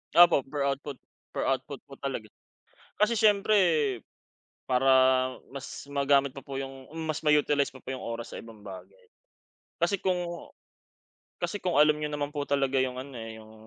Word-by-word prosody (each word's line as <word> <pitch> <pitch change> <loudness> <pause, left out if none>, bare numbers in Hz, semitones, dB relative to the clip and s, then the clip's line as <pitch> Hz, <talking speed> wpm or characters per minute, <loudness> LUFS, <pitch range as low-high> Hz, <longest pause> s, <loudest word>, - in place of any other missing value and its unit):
Opo, 175 -5 +7
per 140 +1 -2
output 140 0 -3 0.3
per - - -2
output - - -2
po - - -11
talaga. - - -4 0.7
Kasi 210 +2 +3
siyempre 215 -1 +4 1.1
para 130 +1 +3 0.6
mas 140 +1 -7
magamit 140 -1 +2
pa 135 - -8
po 135 -1 -6
yung 135 -1 -7 0.2
mas 155 -1 -2
ma-utilize 150 -2 +3
pa 130 - -13
po 130 +1 -6
yung 130 - -7
oras 115 0 -5
sa - - -5
ibang 110 -3 -14
bagay. 95 0 -11 0.7
Kasi 170 +4 +2
kung 175 -2 -2 0.9
kasi 205 - -1
kung 185 -3 -2
alam 150 0 +5
niyo 150 0 -3
naman 145 -1 -2
po 145 -1 -3
talaga 140 -1 +1
yung 130 -1 0
ano, 140 +1 -10
eh, 115 -1 -8
yung 110 0 -15
140 Hz, 160 wpm, -28 LUFS, 130-150 Hz, 1.1 s, Opo